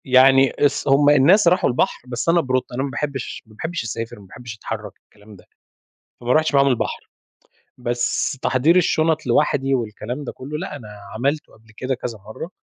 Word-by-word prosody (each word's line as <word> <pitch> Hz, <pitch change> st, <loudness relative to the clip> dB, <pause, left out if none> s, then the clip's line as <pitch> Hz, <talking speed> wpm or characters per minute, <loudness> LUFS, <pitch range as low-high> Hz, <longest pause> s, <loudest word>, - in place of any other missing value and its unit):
يعني 135 Hz, +1 st, +6 dB
اس 140 Hz, -1 st, 0 dB
هُم 145 Hz, +1 st, +5 dB
الناس 165 Hz, +8 st, +5 dB
راحوا 180 Hz, +2 st, +3 dB
البحر 125 Hz, -, 0 dB
بس 120 Hz, +5 st, -2 dB
أنا 170 Hz, 0 st, +4 dB
بروطة، 130 Hz, -3 st, -2 dB
أنا 130 Hz, -, -1 dB
ما 140 Hz, -, -2 dB
باحبش 140 Hz, -2 st, -4 dB
ما 110 Hz, -1 st, -19 dB
باحبش 160 Hz, +3 st, -4 dB
أسافر، 115 Hz, 0 st, -5 dB
ما 100 Hz, -, -14 dB
باحبش 120 Hz, +3 st, -9 dB
أتحرّك، 110 Hz, -, -6 dB
الكلام 105 Hz, 0 st, -17 dB
ده، 95 Hz, -, -18 dB, 0.8 s
فما 120 Hz, +1 st, 0 dB
رُحتش 155 Hz, 0 st, +2 dB
معاهم 140 Hz, 0 st, +5 dB
البحر. 125 Hz, -4 st, -2 dB, 0.7 s
بس 120 Hz, +2 st, -1 dB
تحضير 140 Hz, +7 st, +3 dB
الشنط 160 Hz, -3 st, +2 dB
لوحدي 135 Hz, -2 st, +2 dB
والكلام 120 Hz, +3 st, -4 dB
ده 130 Hz, -, -5 dB
كله، 145 Hz, +4 st, -7 dB
لأ 165 Hz, -2 st, -5 dB
أنا 120 Hz, -7 st, -10 dB, 0.3 s
عملته 140 Hz, +6 st, -2 dB
قبل 110 Hz, 0 st, -21 dB
كده 130 Hz, +1 st, -2 dB
كذا 120 Hz, -2 st, -6 dB
مرة، 110 Hz, -, -9 dB
130 Hz, 180 wpm, -21 LUFS, 120-150 Hz, 0.8 s, يعني